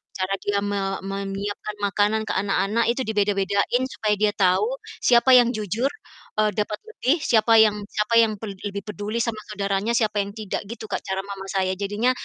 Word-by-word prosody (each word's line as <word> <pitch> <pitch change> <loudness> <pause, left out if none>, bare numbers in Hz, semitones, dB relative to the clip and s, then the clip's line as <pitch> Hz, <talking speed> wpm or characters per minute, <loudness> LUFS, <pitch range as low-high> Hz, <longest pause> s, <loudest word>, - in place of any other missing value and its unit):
cara 185 0 -2
dia 200 0 -1
me 195 -1 -1
menyiapkan 200 +1 -4
makanan 205 +2 +2
ke - - -4
anak-anak, 205 +3 +1
itu 245 +3 +1
dibeda-bedain 205 +2 +1
supaya 215 -5 -1
dia 210 0 +2
tahu 205 +6 +1 0.2
siapa 250 +1 +6
yang 245 -1 +6
jujur, 215 +5 -1 0.5
eee, 215 0 +3
dapat 210 0 -2
lebih, 330 - 0
siapa 225 0 +4
yang 210 -1 +3
siapa 210 +2 0
yang 220 -2 +3
pel 205 -3 -6
lebih 200 0 -3
peduli 210 +2 -4
sama 225 -2 -3
saudaranya, 200 +2 -1
siapa 215 -3 +1
yang 200 - -7
tidak, 210 -2 -4
gitu 220 -2 -7
Kak - - -2
cara 190 0 -2
mama 195 -1 -7
saya. 190 -1 0
Jadinya 205 +5 +1
210 Hz, 175 wpm, -23 LUFS, 200-225 Hz, 0.5 s, siapa